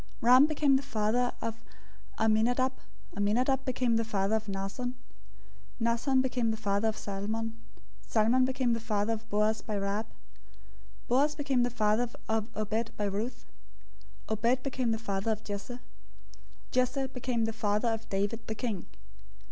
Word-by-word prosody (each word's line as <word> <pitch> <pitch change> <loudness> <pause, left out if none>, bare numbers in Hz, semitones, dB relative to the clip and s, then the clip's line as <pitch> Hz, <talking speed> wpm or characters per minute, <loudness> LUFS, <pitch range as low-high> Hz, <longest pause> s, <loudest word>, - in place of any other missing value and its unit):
001:004 - - -27
Ram 250 +4 +8
became 295 -3 +3
the - - -2
father 245 -1 +1
of 230 0 -4 0.6
Amminadab. 230 +4 +3 0.4
Amminadab 245 +7 +2
became 250 -3 +1
the 230 - +1
father 205 -1 0
of 220 0 -2
Nahshon. 200 +6 -3 0.9
Nahshon 235 +3 +2
became 245 -3 0
the 220 - -1
father 200 0 +1
of 220 - -1
Salmon. 220 +3 -3 0.5
001:005 - - -26
Salmon 230 +4 +4
became 255 -2 +1
the 230 - 0
father 215 0 0
of 220 0 -7
Boaz 210 +1 +2
by 215 - -4
Rahab. 200 +2 -1 1.0
Boaz 285 +5 +3
became 275 -4 +1
the 245 - +2
father 225 0 +1 0.2
of 220 0 0
Obed 220 +2 -2
by 210 - 0
Ruth. 205 +5 -3 0.8
Obed 235 +4 +1
became 260 -3 -1
the 225 - +1
father 200 -1 -2
of 215 0 -2
Jesse. 205 +4 -5
001:006 245 - -12 0.9
Jesse 255 +2 +1
became 250 -3 -1
the 225 - -2
father 210 +1 +1
of 225 0 -3
David 205 +4 -1
the 220 - -3
king. 215 -6 -3
225 Hz, 155 wpm, -30 LUFS, 215-250 Hz, 1.0 s, Ram